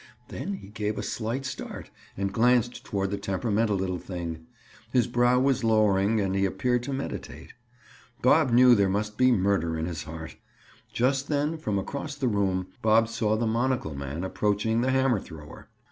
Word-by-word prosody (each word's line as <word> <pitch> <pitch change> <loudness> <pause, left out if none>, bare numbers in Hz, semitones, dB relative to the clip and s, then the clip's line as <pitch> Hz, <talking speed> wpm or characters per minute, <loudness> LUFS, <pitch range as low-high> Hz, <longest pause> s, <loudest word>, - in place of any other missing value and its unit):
Then 200 - -4
he 145 - -9
gave 105 0 -3
a - - -3
slight 120 +4 -3
start 130 - -7 0.3
and 100 0 -2
glanced 120 +2 +2
toward 100 -1 -2
the 100 - -2
temperamental 105 +2 0
little 95 -1 -2
thing; 85 -3 -6 0.4
his 125 -2 +3
brow 120 +1 +3
was 130 -1 +1
lowering, 110 -1 +3
and 95 -2 0
he 95 0 +1
appeared 120 +6 0
to 140 - -4
meditate. 135 0 -6 0.7
Bob 140 +3 +5
knew 125 +1 +7
there 100 -4 +3
must 105 +2 -2
be 130 +3 +4
murder 95 -6 +1
in 80 - -2
his 85 -3 -4
heart. 80 -1 -8 0.5
Just 135 +3 +1
then 150 +2 0
from 110 -11 -2
across 140 +8 -4
the 140 -3 -1
room, 95 -4 0 0.2
Bob 110 +1 +4
saw 110 -2 0
the 115 - 0
monocle 115 - 0
man 70 +4 -5
approaching 105 +4 0
the 130 - +1
hammer 130 -4 +2
thrower. 80 -5 -12
110 Hz, 175 wpm, -27 LUFS, 95-125 Hz, 0.7 s, knew